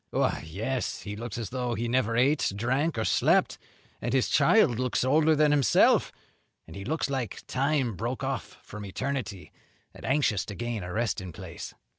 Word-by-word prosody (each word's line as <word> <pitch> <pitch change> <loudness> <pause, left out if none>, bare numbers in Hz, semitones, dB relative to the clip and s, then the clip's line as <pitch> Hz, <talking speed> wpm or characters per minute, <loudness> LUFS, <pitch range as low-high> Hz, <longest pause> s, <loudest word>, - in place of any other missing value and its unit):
"Why, - - 0
yes; 110 +10 -3
he 105 -1 -5
looks 115 +1 -6
as 115 -5 -5
though 125 -2 -2
he 120 +1 -2
never 115 -2 +1
ate, 140 +1 +3
drank, 130 +8 0
or 110 - 0
slept; - - +2 0.4
and 120 +2 -2
his 130 -2 +2
child 130 - +4
looks 125 -1 0
older 155 +4 +4
than 150 0 +4
himself; 140 -7 +4 0.5
and - - -12
he 100 - -6
looks 155 +7 -1
like 130 -7 -4
time 135 -4 0
broke 120 +8 -3
off 135 0 -4
from 105 0 -9
eternity 110 -1 -4 0.4
and - - -13
anxious 130 -7 +1
to 100 - -7
gain 120 -1 -3
a 90 0 -6
resting 105 -4 -2
place." - - -9
120 Hz, 175 wpm, -28 LUFS, 110-135 Hz, 0.5 s, child